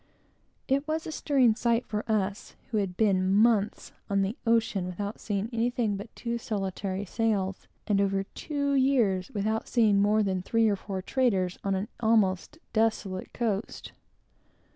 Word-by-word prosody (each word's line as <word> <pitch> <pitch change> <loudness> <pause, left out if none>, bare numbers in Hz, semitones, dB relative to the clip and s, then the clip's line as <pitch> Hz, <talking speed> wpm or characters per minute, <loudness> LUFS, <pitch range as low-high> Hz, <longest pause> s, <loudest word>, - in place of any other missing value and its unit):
It 275 +2 +1
was 315 +1 -2
a - - -5
stirring 270 -6 +3
sight 235 +1 +1
for 210 0 -3
us, 205 -1 -2 0.2
who 220 - 0
had 195 -3 -2
been 190 -3 +2
months 215 -1 +2 0.2
on 200 -1 +2
the 195 +4 -2
ocean 225 -5 +2
without 200 +4 -5
seeing 205 -1 -2
anything 230 -2 0
but 200 +3 -7
two 235 -1 -3
solitary 195 -2 -3
sails; 200 -3 -1 0.2
and 200 -2 +2
over 195 -1 +1
two 285 +6 -3
years 240 -9 +2
without 220 +1 -2
seeing 215 -5 +3
more 210 +1 +3
than 190 -2 0
the 180 - -5
three 230 +3 +2
or 205 - +2
four 190 -1 -5
traders 195 -8 0
on 195 -1 0
an 195 +3 -2
almost 220 +3 +2 0.2
desolate 215 -4 0
coast. 220 -3 -3
210 Hz, 160 wpm, -28 LUFS, 195-230 Hz, 0.2 s, stirring